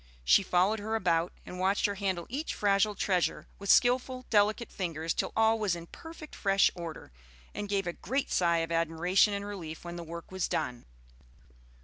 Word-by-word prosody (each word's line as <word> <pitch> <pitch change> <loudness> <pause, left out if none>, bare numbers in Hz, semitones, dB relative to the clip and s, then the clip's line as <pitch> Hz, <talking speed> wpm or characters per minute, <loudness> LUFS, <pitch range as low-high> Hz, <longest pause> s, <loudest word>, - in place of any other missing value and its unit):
She 130 - +6
followed 190 +3 +2
her 220 +2 -2
about 175 -5 +1
and 180 - -8
watched 190 +2 +2
her 205 - +1
handle 190 -3 -2
each 285 +6 -4
fragile 205 +1 +2
treasure 185 -2 0
with 200 0 -6
skilful, 255 +1 +3
delicate 215 +2 +2
fingers 165 -3 -2
till - - -2
all 225 0 +3
was 205 -5 +1
in 170 -1 -8
perfect 325 - -11
fresh 195 -1 +3
order, 165 - -8 0.4
and 205 -1 -5
gave 200 -1 0
a 175 - -2
great 270 +8 -2
sigh 170 -2 +2
of 165 - -12
admiration 165 +5 +2
and 200 0 -4
relief 175 -6 -7
when 175 0 -6
the 170 - -6
work 170 +2 -9
was 190 -2 -1
done. 120 -1 -3
195 Hz, 185 wpm, -30 LUFS, 170-210 Hz, 0.4 s, She